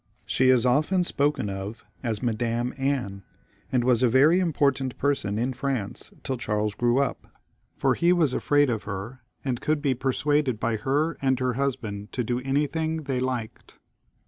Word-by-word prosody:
She 130 Hz, 0 st, +2 dB
is 130 Hz, -2 st, +5 dB
often 155 Hz, +9 st, +3 dB
spoken 145 Hz, -8 st, 0 dB
of 100 Hz, +3 st, -6 dB, 0.2 s
as 115 Hz, -2 st, -2 dB
Madam 120 Hz, +1 st, -1 dB
Anne, 135 Hz, -8 st, -2 dB, 0.5 s
and 125 Hz, -2 st, +2 dB
she -, -, -3 dB
was 125 Hz, -2 st, +3 dB
a 125 Hz, -, +4 dB
very 145 Hz, +9 st, +5 dB
important 140 Hz, -7 st, +1 dB
person 135 Hz, -8 st, 0 dB
in 125 Hz, +3 st, 0 dB
France 125 Hz, -5 st, -3 dB
till 130 Hz, -2 st, -2 dB
Charles 105 Hz, -1 st, -1 dB
grew 120 Hz, +3 st, +1 dB
up; 140 Hz, -1 st, -1 dB, 0.5 s
for 135 Hz, -, +2 dB
he 170 Hz, +6 st, +3 dB
was 165 Hz, -7 st, +3 dB
afraid 145 Hz, -1 st, +3 dB
of 110 Hz, -3 st, -3 dB
her, 105 Hz, +5 st, -6 dB, 0.2 s
and 125 Hz, -3 st, -1 dB
could 155 Hz, 0 st, +1 dB
be 140 Hz, -2 st, +1 dB
persuaded 135 Hz, 0 st, 0 dB
by 115 Hz, -1 st, 0 dB
her 145 Hz, +8 st, 0 dB
and 130 Hz, -1 st, +2 dB
her 130 Hz, -1 st, 0 dB
husband 115 Hz, -6 st, -3 dB
to 125 Hz, -, -1 dB
do 120 Hz, +2 st, -1 dB
anything 150 Hz, +4 st, -1 dB
they 135 Hz, -3 st, -2 dB
liked. 125 Hz, -3 st, -4 dB
130 Hz, 170 wpm, -26 LUFS, 115-140 Hz, 0.5 s, is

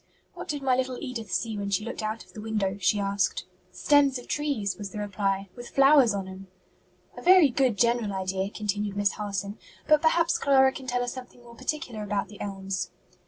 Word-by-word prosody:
"What 355 Hz, +1 st, -8 dB
did 290 Hz, -4 st, -3 dB
my 260 Hz, -1 st, +3 dB
little 255 Hz, 0 st, -1 dB
Edith 235 Hz, -8 st, -6 dB
see 220 Hz, +2 st, -1 dB
when 200 Hz, 0 st, -3 dB
she 200 Hz, +2 st, 0 dB
looked 235 Hz, -, -5 dB
out 215 Hz, +1 st, -4 dB
of -, -, -21 dB
the 215 Hz, -, -8 dB
window?" 210 Hz, -3 st, -1 dB
she 195 Hz, +2 st, +2 dB
asked. 200 Hz, -1 st, 0 dB, 0.3 s
"Stems 280 Hz, +3 st, +3 dB
of 245 Hz, -, -11 dB
trees," 280 Hz, -9 st, -1 dB
was 205 Hz, -1 st, -6 dB
the 205 Hz, -, -9 dB
reply, 195 Hz, -1 st, -2 dB
"with 240 Hz, 0 st, -9 dB
flowers 275 Hz, -5 st, +5 dB
on 195 Hz, -1 st, -4 dB
'em." 190 Hz, +1 st, -10 dB, 0.7 s
"A -, -, -9 dB
very 360 Hz, -4 st, +7 dB
good 250 Hz, -3 st, +1 dB
general 235 Hz, -2 st, +2 dB
idea," 190 Hz, 0 st, -2 dB
continued 205 Hz, -1 st, -3 dB
Miss 205 Hz, -1 st, +2 dB
Harson, 200 Hz, -1 st, -4 dB, 0.3 s
"but 305 Hz, -1 st, +5 dB
perhaps 335 Hz, +1 st, +2 dB
Clara 265 Hz, -1 st, +5 dB
can 265 Hz, -1 st, -9 dB
tell 245 Hz, -1 st, 0 dB
us 245 Hz, -, -3 dB
something 250 Hz, -1 st, -11 dB
more 235 Hz, 0 st, -14 dB
particular 260 Hz, -2 st, -4 dB
about 205 Hz, -2 st, -2 dB
the 205 Hz, -, -12 dB
elms?" 195 Hz, -1 st, -4 dB
220 Hz, 205 wpm, -27 LUFS, 200-260 Hz, 0.7 s, very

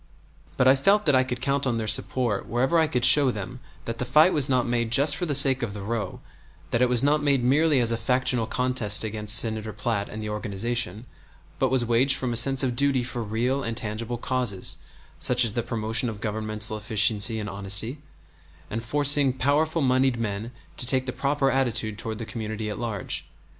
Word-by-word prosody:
But 130 Hz, -, +2 dB
I 130 Hz, -, +6 dB
felt 200 Hz, +10 st, +2 dB
that 145 Hz, -, +2 dB
I 130 Hz, 0 st, +3 dB
could 125 Hz, -1 st, -6 dB
count 140 Hz, +1 st, -1 dB
on 120 Hz, -3 st, -1 dB
their 110 Hz, -, -3 dB
support 110 Hz, -1 st, -1 dB
wherever 130 Hz, +8 st, 0 dB
I 160 Hz, -, +2 dB
could 125 Hz, -4 st, -1 dB
show 140 Hz, +1 st, +6 dB
them 115 Hz, +2 st, -6 dB, 0.3 s
that 115 Hz, 0 st, -6 dB
the -, -, -1 dB
fight 155 Hz, +8 st, +3 dB
was 145 Hz, -2 st, +3 dB
not 125 Hz, -2 st, +1 dB
made 120 Hz, -2 st, -2 dB
just 140 Hz, +5 st, +4 dB
for 175 Hz, +4 st, -3 dB
the 145 Hz, -, +1 dB
sake 135 Hz, -1 st, +7 dB
of 110 Hz, -4 st, -5 dB
the 100 Hz, -, -7 dB
row, 110 Hz, 0 st, -5 dB, 0.5 s
that 115 Hz, -, 0 dB
it 125 Hz, -, +3 dB
was 125 Hz, 0 st, +2 dB
not 150 Hz, +2 st, +2 dB
made 140 Hz, -3 st, +1 dB
merely 145 Hz, +3 st, +2 dB
as 115 Hz, -1 st, +1 dB
a 115 Hz, -, -1 dB
factional 125 Hz, 0 st, 0 dB
contest 125 Hz, -5 st, +1 dB
against 105 Hz, 0 st, -2 dB
Senator 110 Hz, -1 st, 0 dB
Platt 105 Hz, -1 st, -3 dB
and 110 Hz, -, -8 dB
the 105 Hz, -, -6 dB
organization, 105 Hz, +1 st, -3 dB, 0.5 s
but 130 Hz, -, +1 dB
was 130 Hz, -2 st, +1 dB
waged 125 Hz, +4 st, +3 dB
from 125 Hz, -3 st, -3 dB
a -, -, -3 dB
sense 135 Hz, +3 st, +5 dB
of 125 Hz, -2 st, -1 dB
duty 135 Hz, -1 st, +1 dB
for 120 Hz, -1 st, -6 dB
real 120 Hz, +5 st, -2 dB
and 115 Hz, -2 st, -5 dB
tangible 115 Hz, +2 st, -4 dB
causes 120 Hz, -6 st, -2 dB, 0.4 s
such 125 Hz, -1 st, +4 dB
as 110 Hz, -, -2 dB
the 120 Hz, -, -1 dB
promotion 115 Hz, 0 st, -1 dB
of 105 Hz, -2 st, -8 dB
governmental 110 Hz, 0 st, -2 dB
efficiency 110 Hz, +1 st, +3 dB
and 105 Hz, -, -5 dB
honesty, 100 Hz, +6 st, 0 dB, 0.7 s
and 115 Hz, +1 st, -4 dB
forcing 145 Hz, +2 st, +2 dB
powerful 150 Hz, +4 st, 0 dB
moneyed 130 Hz, -1 st, +1 dB
men 110 Hz, 0 st, -4 dB, 0.3 s
to 125 Hz, -, +2 dB
take 130 Hz, 0 st, +1 dB
the 130 Hz, -, -5 dB
proper 140 Hz, -1 st, -1 dB
attitude 115 Hz, -5 st, -2 dB
toward 110 Hz, -1 st, -4 dB
the 115 Hz, -, -6 dB
community 110 Hz, -1 st, -6 dB
at 105 Hz, -, -6 dB
large. 110 Hz, -5 st, -4 dB
120 Hz, 205 wpm, -24 LUFS, 110-135 Hz, 0.7 s, sake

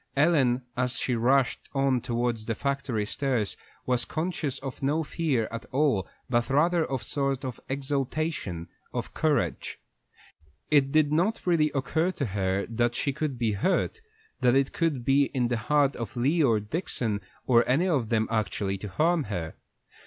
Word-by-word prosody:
Ellen, 135 Hz, -5 st, +3 dB
as 125 Hz, -1 st, 0 dB
she 125 Hz, -, 0 dB
rushed 130 Hz, +3 st, +2 dB
on 135 Hz, -2 st, +2 dB
towards 120 Hz, -2 st, -2 dB
the 115 Hz, -, -1 dB
factory 140 Hz, -5 st, -1 dB
stairs, 120 Hz, -3 st, -1 dB, 0.3 s
was 125 Hz, -1 st, +2 dB
conscious 155 Hz, -5 st, -2 dB
of 135 Hz, -1 st, -7 dB
no 150 Hz, +4 st, +1 dB
fear 145 Hz, -8 st, 0 dB
at 115 Hz, 0 st, -6 dB
all, 130 Hz, -, +2 dB, 0.2 s
but 120 Hz, 0 st, +1 dB
rather 165 Hz, +5 st, +3 dB
of 135 Hz, -5 st, -3 dB
a -, -, -9 dB
sort 135 Hz, +2 st, -1 dB
of 125 Hz, -4 st, -5 dB
exaltation 135 Hz, -, -2 dB, 0.3 s
of -, -, -3 dB
courage. 140 Hz, -, 0 dB, 0.9 s
It 140 Hz, -2 st, +4 dB
did 155 Hz, -1 st, +3 dB
not 180 Hz, +9 st, +1 dB
really 165 Hz, -4 st, +3 dB
occur 160 Hz, +6 st, +1 dB
to 140 Hz, -, -2 dB
her 95 Hz, -2 st, -1 dB
that 120 Hz, +1 st, 0 dB
she 140 Hz, -, 0 dB
could 150 Hz, -2 st, -2 dB
be 115 Hz, -2 st, +1 dB
hurt, 185 Hz, -, 0 dB, 0.4 s
that 125 Hz, -1 st, +4 dB
it 135 Hz, 0 st, +2 dB
could 150 Hz, -8 st, 0 dB
be 140 Hz, +1 st, +4 dB
in 125 Hz, -2 st, +1 dB
the 120 Hz, -, 0 dB
heart 140 Hz, +4 st, +2 dB
of 115 Hz, +1 st, -6 dB
Lee 145 Hz, +8 st, +2 dB
or 115 Hz, -7 st, +4 dB
Dixon, 110 Hz, -, -2 dB, 0.2 s
or 120 Hz, -2 st, +5 dB
any 155 Hz, +9 st, +3 dB
of 135 Hz, -11 st, +1 dB
them, 110 Hz, -1 st, +1 dB
actually 100 Hz, -3 st, -1 dB
to 105 Hz, -, -6 dB
harm 160 Hz, -, +1 dB
her. 85 Hz, -6 st, -4 dB
130 Hz, 165 wpm, -27 LUFS, 115-150 Hz, 0.9 s, or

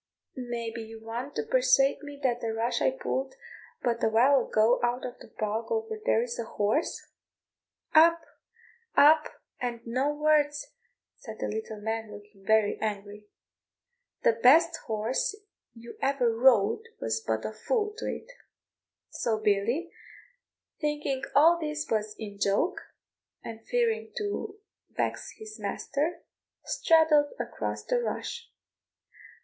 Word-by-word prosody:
May 240 Hz, -3 st, -4 dB
be 230 Hz, 0 st, -6 dB
you 225 Hz, 0 st, -9 dB
want 240 Hz, +5 st, -5 dB
to -, -, -1 dB
persuade -, -, +3 dB
me 290 Hz, -1 st, -9 dB
that 245 Hz, -2 st, +1 dB
the 225 Hz, -2 st, -2 dB
rush 235 Hz, +2 st, -1 dB
I -, -, +4 dB
pulled 265 Hz, 0 st, -3 dB, 0.5 s
but 235 Hz, -1 st, 0 dB
a -, -, +4 dB
while 255 Hz, +5 st, +4 dB
ago 220 Hz, +3 st, +3 dB
out 240 Hz, +1 st, 0 dB
of 245 Hz, -, -7 dB
the -, -, -12 dB
bog 215 Hz, +1 st, -3 dB
over 445 Hz, -1 st, -2 dB
there 230 Hz, -, +3 dB
is 240 Hz, -1 st, -5 dB
a -, -, -1 dB
horse?" 220 Hz, +8 st, -1 dB, 0.9 s
"Up! 335 Hz, +1 st, +7 dB, 0.8 s
up! 305 Hz, +1 st, +7 dB, 0.3 s
and 240 Hz, -2 st, -4 dB
no 255 Hz, +5 st, 0 dB
words," 295 Hz, -1 st, +1 dB, 0.5 s
said 220 Hz, -3 st, -9 dB
the -, -, -3 dB
little 220 Hz, 0 st, -5 dB
man, 220 Hz, 0 st, -3 dB
looking 205 Hz, -1 st, -13 dB
very 215 Hz, 0 st, +2 dB
angry; 210 Hz, -1 st, -4 dB, 1.0 s
"the -, -, +6 dB
best 315 Hz, +9 st, +5 dB
horse 230 Hz, -, -1 dB, 0.4 s
you 235 Hz, +1 st, -11 dB
ever 255 Hz, -4 st, +1 dB
rode 250 Hz, -, +4 dB
was 115 Hz, 0 st, -1 dB
but 110 Hz, 0 st, -2 dB
a -, -, -2 dB
fool 425 Hz, -, -1 dB
to -, -, -4 dB
it." 475 Hz, -, -5 dB, 0.8 s
So 225 Hz, -2 st, -1 dB
Billy, 215 Hz, -, 0 dB, 0.9 s
thinking 295 Hz, -3 st, -1 dB
all 330 Hz, +4 st, +6 dB
this 305 Hz, -1 st, -3 dB
was 215 Hz, -1 st, -1 dB
in 205 Hz, -2 st, -8 dB
joke, 200 Hz, -, +1 dB, 0.6 s
and 225 Hz, 0 st, -8 dB
fearing 460 Hz, -2 st, 0 dB
to 415 Hz, -1 st, -4 dB, 0.3 s
vex -, -, -3 dB
his 435 Hz, 0 st, -10 dB
master, 300 Hz, +5 st, -2 dB, 0.4 s
straddled 315 Hz, -3 st, +4 dB
across -, -, -4 dB
the -, -, +1 dB
rush. 475 Hz, 0 st, -4 dB
250 Hz, 135 wpm, -28 LUFS, 220-310 Hz, 1.0 s, Up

